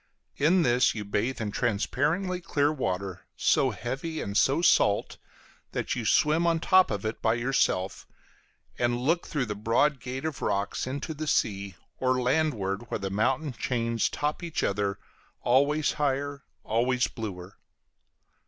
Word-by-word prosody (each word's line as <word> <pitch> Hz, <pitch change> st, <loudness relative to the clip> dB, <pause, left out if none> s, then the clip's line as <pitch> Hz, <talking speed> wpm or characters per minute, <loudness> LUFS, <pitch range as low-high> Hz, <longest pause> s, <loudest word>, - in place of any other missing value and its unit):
In 170 Hz, +5 st, +4 dB
this 125 Hz, -2 st, +3 dB
you 105 Hz, -2 st, -4 dB
bathe 110 Hz, +5 st, -1 dB
in 105 Hz, -2 st, -2 dB
transparently 150 Hz, -, 0 dB
clear 145 Hz, -3 st, +1 dB
water, 95 Hz, -, -3 dB, 0.2 s
so -, -, +3 dB
heavy 135 Hz, +7 st, -4 dB
and 100 Hz, +1 st, -4 dB
so 140 Hz, +9 st, +3 dB
salt 105 Hz, -10 st, +3 dB, 0.6 s
that -, -, -1 dB
you -, -, -3 dB
swim 160 Hz, +3 st, +3 dB
on 170 Hz, -, +3 dB
the 165 Hz, -, -4 dB
top 185 Hz, 0 st, +5 dB
of 105 Hz, -1 st, -3 dB
it 110 Hz, -, -3 dB
by 110 Hz, 0 st, +2 dB
yourself, 120 Hz, -6 st, 0 dB, 0.7 s
and 120 Hz, 0 st, +1 dB
look 160 Hz, +8 st, 0 dB
through 140 Hz, -4 st, -1 dB
the 105 Hz, -, -3 dB
broad 115 Hz, +7 st, +1 dB
gate 130 Hz, +4 st, -5 dB
of 160 Hz, -3 st, -4 dB
rocks 100 Hz, +4 st, -1 dB
into 140 Hz, +4 st, -4 dB
the 155 Hz, +1 st, -5 dB
sea, 100 Hz, -7 st, 0 dB, 0.2 s
or 130 Hz, 0 st, +2 dB
landward 120 Hz, -6 st, 0 dB
where -, -, -1 dB
the 100 Hz, -2 st, -4 dB
mountain 130 Hz, +8 st, 0 dB
chains 115 Hz, 0 st, -1 dB
top 150 Hz, +3 st, -2 dB
each 170 Hz, -2 st, -3 dB
other, 100 Hz, 0 st, 0 dB, 0.5 s
always 145 Hz, +5 st, +3 dB
higher, 140 Hz, 0 st, -2 dB, 0.2 s
always 125 Hz, +2 st, +1 dB
bluer. 100 Hz, -5 st, -7 dB
125 Hz, 155 wpm, -27 LUFS, 105-150 Hz, 0.7 s, top